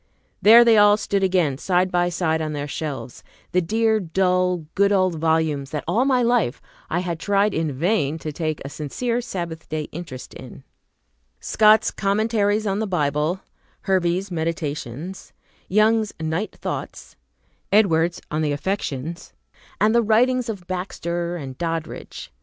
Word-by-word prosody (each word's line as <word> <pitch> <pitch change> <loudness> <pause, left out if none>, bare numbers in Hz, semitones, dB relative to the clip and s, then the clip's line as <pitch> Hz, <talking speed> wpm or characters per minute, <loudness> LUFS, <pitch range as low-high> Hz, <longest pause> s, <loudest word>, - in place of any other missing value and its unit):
There 230 +3 +8
they 230 -2 +6
all 205 0 +6
stood 200 -2 -1
again 180 -8 +1
side 185 +1 +1
by 175 0 +2
side 160 -2 0
on 155 -1 -3
their 145 0 -4
shelves, 140 -5 -6 0.3
the 180 - +2
dear, 220 +4 +1
dull, 180 -1 +1
good 200 0 +3
old 185 -3 +3
volumes 160 -3 +1
that 150 -1 -4
all 245 +4 +2
my 255 -3 +3
life 235 - +1 0.3
I 175 - 0
had 170 -3 -4
tried 200 +4 +2
in 160 -2 -1
vain 160 +1 0
to 155 -1 -5
take 155 0 -3
a - - -4
sincere 230 - -2
Sabbath 170 -8 -6
day 155 -1 -2
interest 155 -6 -8
in, - - -11 0.8
Scott's 215 0 +4
Commentaries 210 +1 +1
on 195 0 0
the 220 - -1
Bible, 155 +1 0 0.4
Hervey's 185 0 0
"Meditations," 160 0 -4 0.3
Young's 215 +2 +2
"Night 160 +6 -3
Thoughts," - - -6 0.6
"Edwards 175 -5 +3
on 155 +1 -1
the 150 -2 0
Affections," 165 -1 -4 0.5
and 215 +2 +3
the 235 - +4
Writings 240 +3 +2
of 200 -5 -5
Baxter 175 -2 -3
and 135 -5 -7
Doddridge. 165 -2 -5
180 Hz, 145 wpm, -22 LUFS, 160-205 Hz, 0.8 s, There